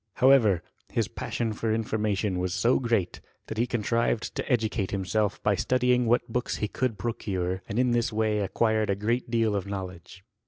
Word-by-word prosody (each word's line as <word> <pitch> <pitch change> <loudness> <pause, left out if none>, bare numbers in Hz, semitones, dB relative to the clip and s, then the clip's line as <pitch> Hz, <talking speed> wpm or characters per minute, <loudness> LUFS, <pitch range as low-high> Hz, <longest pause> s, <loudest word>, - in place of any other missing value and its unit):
However, 115 -10 +5 0.3
his - - 0
passion 115 -2 -3
for 110 +1 -2
information 105 -3 0
was 90 0 -1
so 120 +2 +3
great, 115 -8 -1 0.2
that 110 - -5
he 120 - +2
contrived 115 0 0
to - - -4
educate 110 -4 +1
himself 100 +1 -1
by 105 - +3
studying 125 +4 +2
what 120 +1 +2
books 125 +1 -2
he 105 - -1
could 120 0 -2
procure, 95 -4 -2
and 105 - -3
in 125 0 +3
this 120 0 +1
way 110 -1 +1
acquired 110 +1 +1
a 100 - +2
great 115 +5 -1
deal 115 -3 +1
of 100 -1 -2
knowledge. 95 -1 -7
110 Hz, 180 wpm, -27 LUFS, 100-120 Hz, 0.3 s, However